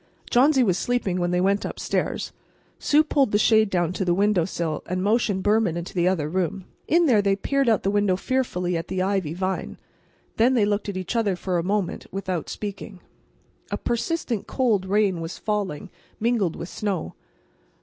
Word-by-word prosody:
Johnsy 265 +2 +5
was 190 -6 +1
sleeping 225 -7 -1
when 175 0 0
they 180 0 +1
went 195 +2 +2
upstairs. - - -2 0.5
Sue 300 +1 +4
pulled 280 -6 +1
the 205 - +3
shade 220 0 +4
down 175 -2 0
to 190 - -2
the 175 -2 +1
window 200 -3 +2
sill, 165 -4 -3
and 185 +1 -2
motioned 205 -2 +1
Behrman 210 -5 +2
into 170 +1 -6
the 175 -1 +1
other 175 -6 +1
room. 185 +2 -2 0.2
In 340 +2 +4
there 235 -8 +4
they 200 -1 +2
peered 275 +5 0
out 220 - +2
the 195 - +1
window 205 -2 +2
fearfully 180 -6 -1
at 165 - -3
the 185 -1 -1
ivy 190 -5 -1
vine. 185 +1 -3 0.6
Then 245 +4 +4
they 220 -4 +4
looked 205 0 -1
at 195 - -4
each 185 +5 -4
other 210 -5 +1
for 180 0 -1
a - - -2
moment 195 -1 -2
without 185 -3 -3
speaking. 200 -1 -6 0.7
A - - -2
persistent, 240 - -2
cold 220 -8 +1
rain 195 -3 +1
was 165 +1 -6
falling, 205 -4 -3 0.3
mingled 220 -7 +1
with 170 - -6
snow. 195 -6 -3
195 Hz, 185 wpm, -24 LUFS, 180-220 Hz, 0.7 s, Johnsy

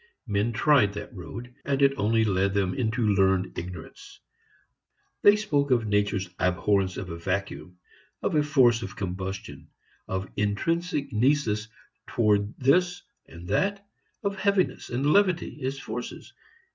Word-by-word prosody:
Men 105 0 0
tried 115 -3 +3
that 105 0 -7
road, 115 +8 -8
and 140 -1 0
it 140 -1 +5
only 110 +1 +2
led 100 -1 +1
them 95 -2 +1
into 110 -2 0
learned 95 -1 +2
ignorance. 90 -1 -9 1.0
They 205 - +7
spoke 145 -10 0
of 120 -3 +2
nature's 105 -2 0
abhorrence 95 +1 +1
of 90 -2 -5
a 85 - -6
vacuum; 90 0 -4 0.5
of - - 0
a 150 - +4
force 130 -6 +4
of 95 -3 -7
combustion; 95 -5 -6 0.4
of 95 0 -3
intrinsic 150 - -1
nisus 110 -3 +1 0.4
toward 105 -2 +1
this 175 +7 +2 0.2
and 85 +1 -11
that; 200 +1 0 0.4
of 200 -1 -1
heaviness 200 -2 0
and 125 +3 -2
levity 185 -6 +1
as 135 +1 -2
forces. 120 -2 -7
110 Hz, 135 wpm, -26 LUFS, 95-140 Hz, 1.0 s, They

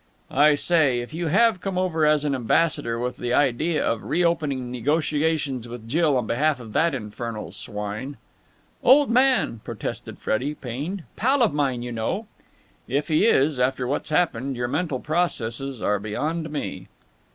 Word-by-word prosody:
"I 150 +2 +5
say, 145 -5 +2
if 120 +5 -9
you 170 +1 -2
have 210 +3 +3
come 195 -1 -3
over 165 -4 +1
as 150 -1 +3
an 145 - +1
ambassador 125 -1 +1
with 125 +1 -3
the 120 0 -1
idea 145 +4 +1
of 115 - -1
reopening 150 -7 0
negotiations 145 0 0
with 120 -1 -9
Jill 150 +1 +2
on 125 - -1
behalf 140 +5 +1
of 110 -3 -10
that 165 -3 +2
infernal 110 -1 -6
swine...." 105 +7 -5 0.6
"Old 280 -1 +5
man!" 255 - +3
protested - - -6
Freddie, 140 +7 -1
pained. 145 +10 -5
"Pal 260 +4 +3
of 220 - +2
mine, 135 -5 0
you 120 - -5
know." 120 - -2 0.6
"If 145 +5 -1
he 155 +8 +4
is, 145 - +3
after 130 0 +1
what's 140 +4 -2
happened, 140 -5 0
your 120 0 -2
mental 145 0 -1
processes 135 -6 -2
are 105 0 +1
beyond 155 +11 -3
me." 150 -1 -5
145 Hz, 160 wpm, -24 LUFS, 120-165 Hz, 0.6 s, I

